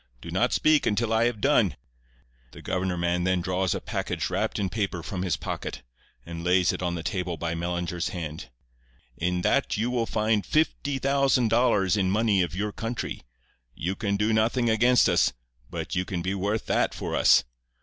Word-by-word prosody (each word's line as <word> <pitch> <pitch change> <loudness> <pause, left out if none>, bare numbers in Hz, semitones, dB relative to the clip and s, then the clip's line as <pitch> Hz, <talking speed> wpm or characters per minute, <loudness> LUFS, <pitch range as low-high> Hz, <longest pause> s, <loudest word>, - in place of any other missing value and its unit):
'Do - - -9
not - - +1
speak 155 -1 +3
until 115 +1 +1
I 110 +1 +3
have 120 -3 -1
done.' - - +3 0.8
"The - - -11
governor 90 -1 -1
man 85 +1 0
then 90 0 +1
draws 90 +1 0
a - - -2
package - - -3
wrapped - - -1
in 100 - 0
paper 95 -3 -3
from 90 +1 -4
his 95 -2 0
pocket, 70 - -5 0.4
and 85 0 -7
lays 90 -1 +3
it - - -5
on 85 -1 -1
the 80 - -5
table 90 -2 -2
by 80 +2 -2
Mellinger's 85 0 -2
hand. 80 -6 -6 0.7
"'In 90 +1 -1
that 140 +1 +1
you 115 +4 0
will 120 -2 0
find 110 -1 +1
fifty 145 -2 0
thousand 135 -3 +2
dollars 105 -5 +3
in 95 -2 +1
money 105 -1 +2
of 85 -2 -2
your 105 +2 -2
country. 115 +3 -4 0.5
You 90 +4 -2
can 100 -1 -1
do 105 +2 +1
nothing 115 +2 +2
against 120 +3 +4
us, 85 -7 +3 0.4
but - - -5
you 90 - +1
can 90 -2 -4
be 95 +2 -1
worth 100 +3 -1
that - - +1
for - - -3
us. - - +5
95 Hz, 190 wpm, -26 LUFS, 90-115 Hz, 0.8 s, us